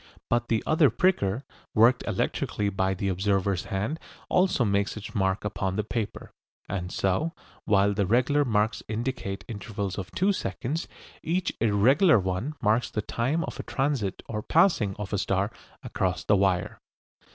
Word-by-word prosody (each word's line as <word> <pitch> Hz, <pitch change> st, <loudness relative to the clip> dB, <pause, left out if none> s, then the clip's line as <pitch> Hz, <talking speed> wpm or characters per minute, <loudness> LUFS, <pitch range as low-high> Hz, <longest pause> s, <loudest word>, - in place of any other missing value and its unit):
But 120 Hz, 0 st, +2 dB
the 115 Hz, -2 st, 0 dB
other 155 Hz, -2 st, +4 dB
pricker, 130 Hz, -, +1 dB, 0.3 s
worked 115 Hz, +3 st, +5 dB
electrically 105 Hz, -1 st, -1 dB
by 95 Hz, 0 st, 0 dB
the 100 Hz, +2 st, -2 dB
observer's 95 Hz, -1 st, 0 dB
hand, 105 Hz, +12 st, -2 dB, 0.3 s
also 180 Hz, -9 st, +3 dB
makes 100 Hz, +1 st, 0 dB
its 105 Hz, +1 st, -8 dB
mark 95 Hz, -2 st, 0 dB
upon 95 Hz, -2 st, -2 dB
the 105 Hz, -, 0 dB
paper, 110 Hz, 0 st, -4 dB, 0.4 s
and 90 Hz, -2 st, -4 dB
so, 120 Hz, -, 0 dB, 0.3 s
while 100 Hz, -1 st, +3 dB
the 100 Hz, -2 st, 0 dB
regular 130 Hz, +7 st, +3 dB
marks 110 Hz, -3 st, +1 dB
indicate 110 Hz, -3 st, -3 dB
intervals 100 Hz, -3 st, -4 dB
of 95 Hz, -, -6 dB
two 195 Hz, +2 st, +1 dB
seconds, 150 Hz, -3 st, -3 dB, 0.3 s
each 175 Hz, +3 st, -1 dB
irregular 120 Hz, -, +5 dB
one 95 Hz, +10 st, -2 dB
marks 110 Hz, +3 st, +2 dB
the 105 Hz, -, -3 dB
time 135 Hz, +11 st, -1 dB
of -, -, -6 dB
a -, -, -3 dB
transit 135 Hz, -8 st, -1 dB
or 105 Hz, -1 st, -3 dB
passing 125 Hz, -, +3 dB
of 105 Hz, 0 st, -6 dB
a 100 Hz, -, +1 dB
star 95 Hz, +2 st, 0 dB, 0.3 s
across 90 Hz, -2 st, -1 dB
the 105 Hz, -, +3 dB
wire. 95 Hz, -2 st, 0 dB
105 Hz, 155 wpm, -27 LUFS, 95-130 Hz, 0.4 s, worked